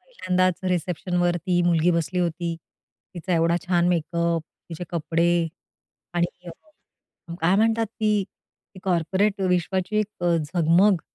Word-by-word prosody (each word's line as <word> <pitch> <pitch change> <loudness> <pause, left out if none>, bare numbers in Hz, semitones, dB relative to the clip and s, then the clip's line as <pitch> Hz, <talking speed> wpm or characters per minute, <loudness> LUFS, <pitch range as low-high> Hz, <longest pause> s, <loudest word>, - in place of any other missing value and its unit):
पहिल्यांदाच 185 - 0
रिसेप्शनवर 175 0 0
ती 175 +1 0
मुलगी 170 0 +3
बसली 170 +2 -1
होती, 170 -1 -2 0.6
तिचा 180 +1 -2
एवढा 165 +1 +2
छान 175 -1 +2
मेकअप, 170 -1 0 0.3
तिचे 170 +1 -6
कपडे 170 0 0 0.9
आणि 175 +1 -2
अ, 170 - -16
काय 175 +4 +3
म्हणतात 225 +1 +2
ती 210 -2 0 0.5
ते 185 - -10
कॉर्पोरेट 190 +3 +1
विश्वाची 185 +2 0
एक 210 -4 -4
अ, 170 -1 +3
झगमग 170 +4 +3
175 Hz, 125 wpm, -24 LUFS, 170-190 Hz, 0.9 s, मुलगी